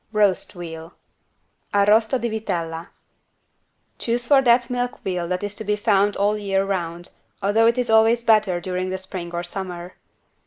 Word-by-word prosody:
129 215 -1 +4
ROAST 185 - -4
VEAL 165 -2 -8 0.8
(Arrosto 220 +5 +4
di 240 - -1
vitella) 175 -7 -3 1.1
Choose 240 +1 -1
for 270 +2 +5
that 245 -1 +4
milk 245 -1 -3
veal 180 -2 -2
that 180 +2 -2
is 205 0 -3
to 210 - -7
be 210 0 0
found 205 -1 +2
all 205 +1 +2
the 210 - -4
year 195 -1 0
round, 175 -3 -3 0.3
although 220 +3 +3
it 235 +2 +2
is 245 -2 0
always 225 +2 +4
better 215 -6 +3
during 185 +1 -3
the 190 - -2
spring 185 -2 -7
or 175 0 -3
summer. 180 -1 -5
200 Hz, 170 wpm, -22 LUFS, 180-220 Hz, 1.1 s, for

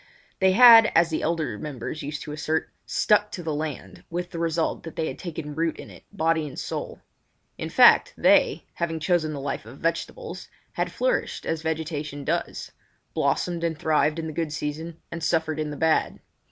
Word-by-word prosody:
They 190 -1 +4
had, 230 0 +9
as 165 0 +4
the 155 - -1
elder 160 -9 -1
members 150 +1 -5
used 145 +1 -5
to 150 - -7
assert, 155 +1 -2 0.2
"stuck 210 0 +2
to 180 - -5
the 160 -2 -2
land", 150 -2 -5
with 175 +1 -4
the 170 - -5
result 165 -1 0
that 165 - -9
they 160 - -1
had 130 - -6
taken 160 -4 -6
root 165 +2 -1
in - - -10
it, - - -15
body 165 -5 0
and 135 - -10
soul. - - -5 0.6
In - - -4
fact, - - +6
they, - - +4
having 165 -1 -2
chosen 155 -1 +1
the 145 - -5
life 140 +1 -3
of 125 +4 -11
vegetables, 170 - -3 0.2
had - - -2
flourished - - -1
as 160 -1 -2
vegetation 155 -3 -3
does—blossomed 170 +4 -3
and 165 -2 -1
thrived 155 0 +1
in 165 - -3
the 160 - -5
good 160 0 -2
season 155 +2 -5
and 170 -1 -5
suffered 160 -2 0
in 155 -1 -2
the 145 - -6
bad. 160 -1 +1
160 Hz, 185 wpm, -25 LUFS, 150-170 Hz, 0.6 s, had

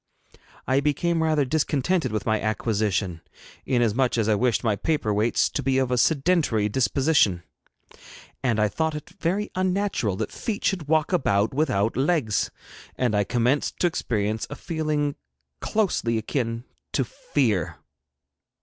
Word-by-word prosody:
I 130 +1 +2
became 160 +4 0
rather 155 -3 +2
discontented 150 - 0
with 110 - -2
my 110 -1 +1
acquisition, 105 -5 -1 0.5
inasmuch 120 0 +2
as 110 -2 +1
I 110 - +4
wished 120 +3 +1
my 110 -3 +2
paper 130 -3 0
weights 110 +3 +2
to - - -2
be 135 0 +1
of 130 -1 +1
a 125 - +2
sedentary 145 - +2
disposition, 130 - +2 1.0
and 120 -4 +1 0.2
thought 160 -1 0
it 150 +4 -8
very 195 +5 -1
unnatural 185 - 0
that - - -3
feet 215 -3 -4
should 180 -7 0
walk 155 +3 +1
about 105 - +2
without 130 -8 +1
legs, 135 - +1 0.5
and 125 -4 0
I 105 - +3
commenced 125 +6 0
to - - +4
experience 110 -9 -1
a - - -6
feeling 150 -3 -2 0.4
closely 180 - 0
akin 115 0 -2 0.3
to 135 - +2
fear. 115 - -1
130 Hz, 140 wpm, -25 LUFS, 110-160 Hz, 1.0 s, I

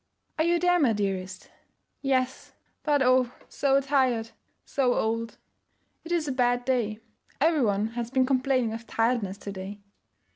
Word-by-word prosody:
'Are - - +4
you 345 0 +3
there, 355 +1 +3
my 260 -8 +3
dearest?' 190 -2 -3 0.5
'Yes, 260 -1 -1 0.3
but 290 -3 +2
oh, 255 -1 +4 0.2
so 275 -1 +2
tired, 260 -5 +1 0.3
so 255 -3 +1
old!' 230 +1 -1 0.7
'It 335 - -9
is 335 -3 +1
a - - 0
bad 245 -1 +1
day. 230 -5 0 0.4
Every 315 +1 +3
one 210 -1 +1
has 235 0 -4
been 260 0 +2
complaining 255 -3 +1
of 230 +1 -7
tiredness 225 -4 0
to 200 - -7
day.' 195 +1 -7
250 Hz, 150 wpm, -27 LUFS, 225-275 Hz, 0.7 s, Are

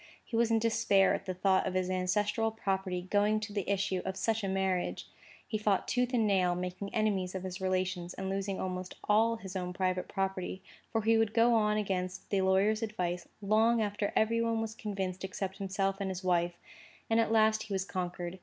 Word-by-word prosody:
He 235 - -5
was 230 0 +3
in 225 - +3
despair 215 -3 +3
at - - -4
the 185 - -1
thought 190 +1 +2
of 185 - -3
his 185 -1 +1
ancestral 205 +4 +1
property 190 -4 -2
going 210 +1 +3
to 210 -1 -5
the 200 -2 -2
issue 195 -2 0
of 190 0 -4
such 225 +2 0
a - - 0
marriage. 190 -1 -1 0.4
He 215 - -2
fought 205 -3 +1
tooth 250 0 +1
and 235 -4 +2
nail, 185 -3 +2
making 180 +2 -4
enemies 195 -4 0
of 190 - -4
his 185 +1 -5
relations, 185 -1 -1
and 190 - -4
losing 195 0 -2
almost 185 0 -4
all 225 +2 +3
his 195 -4 -9
own 180 -1 -3
private 185 -1 -1
property; 190 -1 -3 0.3
for 225 -2 0
he 225 +1 +4
would 225 -1 +1
go 235 +1 +5
on 210 -2 +3
against 185 -3 -3
the 195 -1 +2
lawyer's 195 +4 +3
advice, 180 -6 -2 0.2
long 220 +3 +4
after 205 -1 -1
every 230 +1 +2
one 230 -1 +1
was 225 -1 -3
convinced 195 -4 -4
except 190 0 -4
himself 195 0 -1
and 195 - -1
his 190 0 -5
wife. 175 -1 +1 0.6
At 225 0 +3
last 220 -1 +4
he 215 -2 -5
was 190 0 -1
conquered. 180 -1 -4
195 Hz, 200 wpm, -31 LUFS, 185-215 Hz, 0.6 s, go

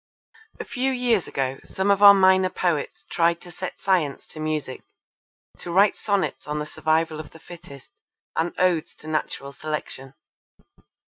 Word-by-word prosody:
A - - -5
few 265 +1 -1
years 245 -6 +1
ago 135 0 -2
some 190 +1 0
of 200 0 +2
our 200 -1 +10
minor 190 -1 +4
poets 170 -6 -2
tried 170 0 +2
to 175 - -12
set 185 +2 -7
Science 175 -8 0
to 155 - -10
music, 155 -4 -3 0.8
to 175 - -7
write 195 +4 +4
sonnets 200 -7 -2
on 150 0 -2
the 150 - -3
survival 155 +1 0
of 155 - -8
the 160 - -16
fittest 155 -5 -13 0.4
and 165 +2 0
odes 180 -4 +1
to 155 - -13
Natural 155 -3 -3
Selection. 140 -2 -6
165 Hz, 155 wpm, -24 LUFS, 150-190 Hz, 0.8 s, our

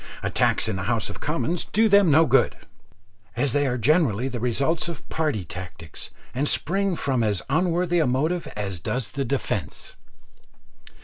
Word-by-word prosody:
Attacks - - +2
in 105 -3 -1
the 95 - -4
House 115 -2 0
of - - -10
Commons 165 +2 -1
do 220 +1 +2
them 200 -3 +5
no 155 +3 +6
good, - - +3 0.8
as 130 +1 0
they 145 -1 +2
are 125 -1 -1
generally 125 - +2
the 125 -3 -4
result 135 +8 0
of 170 -3 -7
party 150 - -1
tactics, 85 -2 -7 0.2
and 140 +4 0
spring 195 +4 +1
from 135 -6 0
as 105 -4 0
unworthy 175 +2 +1
a 155 - +2
motive 155 +8 0
as 100 -4 -3
does 120 +6 -3
the 140 -2 -2
defence. 135 +2 -3
140 Hz, 165 wpm, -24 LUFS, 115-165 Hz, 0.8 s, no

